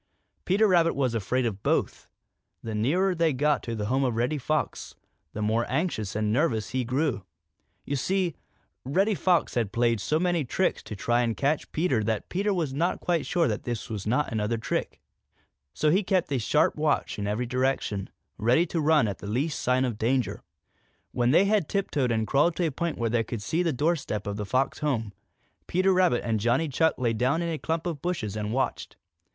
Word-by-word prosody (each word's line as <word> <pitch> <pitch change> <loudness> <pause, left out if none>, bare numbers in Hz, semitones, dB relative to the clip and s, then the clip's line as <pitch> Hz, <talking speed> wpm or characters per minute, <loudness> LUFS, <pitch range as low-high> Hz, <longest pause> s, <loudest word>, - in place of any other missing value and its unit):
Peter 205 +4 +3
Rabbit 170 -3 +3
was 130 -4 0
afraid 120 +4 0
of 100 -4 -3
both. - - -1 0.6
The 115 - -4
nearer 175 - +1
he 165 -2 +2
got 145 +2 +1
to 115 - -4
the 105 -1 -3
home 130 +5 +1
of 125 -3 0
Reddy 125 +6 0
Fox, 155 +3 -2 0.4
the 105 - -3
more 110 +2 +1
anxious 130 - -1
and 105 0 0
nervous 115 -6 0
he 130 0 0
grew. 130 - -1 0.6
You 140 - -2
see, 180 +5 0 0.5
Reddy 190 - +1
Fox 180 -2 +1
had 115 -5 0
played 115 -1 +1
so 155 +8 +1
many 175 -2 +1
tricks 180 +9 0
to 105 - -6
try 120 +4 +1
and 115 -2 -1
catch 145 +2 0
Peter 155 -9 +1
that 110 0 -2
Peter 200 +3 0
was 165 -8 -1
not 170 +6 0
quite 170 -3 -1
sure 170 -2 +2
that - - -2
this 120 -3 -5
was 105 -2 -4
not 125 +7 +1
another 110 +1 -1
trick. 115 - -3 0.7
So 150 - +1
he 190 +5 +3
kept 185 -6 0
a 135 - +1
sharp 150 +7 +2
watch 150 -7 0
in 100 - -2
every 105 +4 -1
direction, 125 -5 -1 0.3
ready 125 +10 +3
to 165 -1 -2
run 150 -5 +4
at 100 -3 -4
the - - -8
least 140 +9 -1
sign 125 +1 +2
of 115 -4 -3
danger. 125 +2 0 0.7
When 120 0 +1
they 170 +8 +5
had 200 -5 +1
tiptoed 150 - 0
and 110 -1 +1
crawled 150 +8 +2
to 175 - 0
a 160 - 0
point 170 +3 -3
where 115 -1 -1
they 115 -1 +2
could 110 -1 -6
see 165 +10 0
the 170 -2 +1
doorstep 140 - -1
of 100 -1 -3
the 105 -1 -4
Fox 130 +5 0
home, 115 -9 -1 0.5
Peter 185 +2 +2
Rabbit 180 -9 +3
and 115 -2 0
Johnny 120 +9 +1
Chuck 160 +4 +2
lay 120 -3 0
down 130 +9 +1
in 170 - -2
a 160 -2 -3
clump 165 +1 -2
of 165 -5 -3
bushes 135 - -2
and 105 0 -3
watched. 130 +3 -2
130 Hz, 205 wpm, -27 LUFS, 115-165 Hz, 0.7 s, they